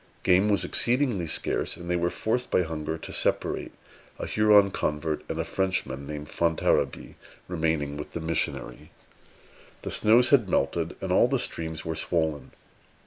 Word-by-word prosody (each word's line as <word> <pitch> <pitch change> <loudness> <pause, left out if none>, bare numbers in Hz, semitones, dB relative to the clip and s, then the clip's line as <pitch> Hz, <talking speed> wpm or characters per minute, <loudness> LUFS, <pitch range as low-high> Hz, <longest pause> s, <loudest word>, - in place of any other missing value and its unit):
Game 95 +3 +4
was 100 -1 +3
exceedingly 120 - +1
scarce, - - -2
and 85 0 -9
they 90 - 0
were 85 0 +1
forced 120 +7 -2
by 90 - +3
hunger 80 -1 -4
to - - -9
separate, - - -1 0.5
a - - -4
Huron 105 -2 +5
convert 75 -1 -2
and 80 - -3
a - - +1
Frenchman 85 -6 -2
named 75 0 -6
Fontarabie 85 +1 0 0.3
remaining 80 -4 -1
with 75 - -8
the - - -3
missionary. 80 -6 -3 0.9
The - - -4
snows 120 +4 +4
had 120 -9 +4
melted, 85 -1 0
and 95 - -3
all 95 - +5
the 135 +2 +1
streams 80 -9 -4
were 80 - -2
swollen. 80 -3 -1
85 Hz, 155 wpm, -27 LUFS, 80-100 Hz, 0.9 s, Huron